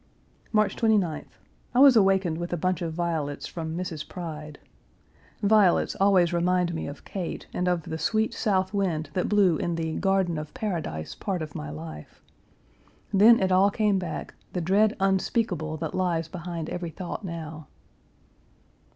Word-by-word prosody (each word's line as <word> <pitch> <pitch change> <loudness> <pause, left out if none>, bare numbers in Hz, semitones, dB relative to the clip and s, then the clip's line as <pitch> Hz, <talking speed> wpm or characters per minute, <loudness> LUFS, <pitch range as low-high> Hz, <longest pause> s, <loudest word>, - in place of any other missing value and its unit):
March 215 -1 +2
29th. 205 -9 0 0.4
I - - +4
was 275 -2 +8
awakened 190 -5 +3
with 175 0 -4
a 175 - -1
bunch 185 +1 0
of 165 -1 -2
violets 160 -4 -2
from 160 -1 -5
Mrs. 165 -4 -5
Pride. 155 -4 -7 0.9
Violets 205 -3 +4
always 185 -4 +4
remind 175 0 +1
me 160 - -4
of 145 - -9
Kate 185 -4 -5
and 180 - -1
of 175 -2 +1
the 160 - -5
sweet 220 +8 +1
South 190 -3 0
wind 175 -6 -1
that 180 - -1
blew 195 -6 +4
in 170 +2 -1
the 160 -1 -2
garden 190 -4 +1
of 150 0 -8
paradise 160 - -3
part 185 -5 -3
of 155 -2 -8
my 75 0 -6
life. 75 0 -9 0.9
Then, 220 +4 +7
it 190 -1 +1
all 190 +2 +5
came 205 -2 +1
back: 170 -4 -5 0.2
the 180 - -1
dread 200 +5 +3
unspeakable 190 -4 0
that 160 -1 -4
lies 170 -3 0
behind 170 -2 -5
every 175 -1 -3
thought 180 +4 -6
now. 160 -4 -7
175 Hz, 160 wpm, -26 LUFS, 160-195 Hz, 0.9 s, was